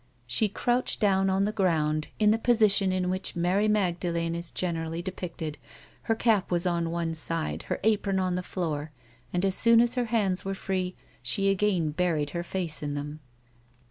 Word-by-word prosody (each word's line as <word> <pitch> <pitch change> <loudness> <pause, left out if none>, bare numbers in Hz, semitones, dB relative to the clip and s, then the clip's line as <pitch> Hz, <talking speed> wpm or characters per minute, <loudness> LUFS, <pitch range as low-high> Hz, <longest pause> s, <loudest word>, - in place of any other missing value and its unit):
She 205 - +1
crouched 245 +5 0
down 195 -2 +3
on 190 +1 +2
the 210 - 0
ground 155 -7 0
in 210 -1 +4
the 225 - +2
position 215 -5 +4
in 185 0 0
wliich 185 +1 -2
Mary 185 +5 +1
^lagdalene 170 -4 0
is 170 0 -2
generally 165 -2 -3
depicted; 170 -4 -5 0.5
her 225 - +4
cap 220 -4 +2
was 175 0 +1
on 170 -2 0
one 165 -1 -2
side, 160 0 -2
her - - -1
apron 205 -2 +1
on 185 -1 0
the 180 - -1
floor, 160 -5 -3 0.4
and 180 +2 0
as 190 - +1
soon 230 +3 +6
as 240 +1 +3
her 250 -1 0
hands 205 -5 0
were 195 0 -3
free 185 -1 -3 0.3
she 195 -1 +2
again 190 -5 +1
buried 155 -3 0
her 170 - -3
face 170 -4 -2
in 145 -1 -3
them. 145 +1 -5
185 Hz, 180 wpm, -27 LUFS, 165-200 Hz, 0.5 s, soon